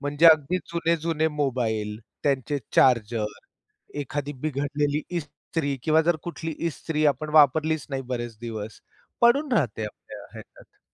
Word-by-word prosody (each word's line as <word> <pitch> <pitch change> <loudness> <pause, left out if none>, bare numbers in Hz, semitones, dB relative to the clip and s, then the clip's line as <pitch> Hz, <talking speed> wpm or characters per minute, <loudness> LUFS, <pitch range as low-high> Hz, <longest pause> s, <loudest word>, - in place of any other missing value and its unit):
म्हणजे 145 +3 +3
अगदी 160 +2 +6 0.2
जुने-जुने 165 -1 +1
मोबाईल, 115 -8 -1 0.2
त्यांचे 140 0 0 0.2
चार्जर, 115 -3 +4 0.8
एखादी 145 +1 -3
बिघडलेली 145 0 -1 0.2
इस्त्री 145 -2 -3
किंवा 160 0 +4
जर 170 +1 +2
कुठली 165 -1 -5 0.2
इस्त्री 155 -1 -2
आपण 150 +1 +1
वापरलीच 155 +1 +4
नाही 135 -1 -2
बरेच 120 -3 -4
दिवस. 110 -2 -6 0.4
पडून 265 +4 +4
राहते 120 - +1
आपल्या 105 - -10
ह्याच्यात. - - -14
145 Hz, 120 wpm, -25 LUFS, 125-160 Hz, 0.8 s, अगदी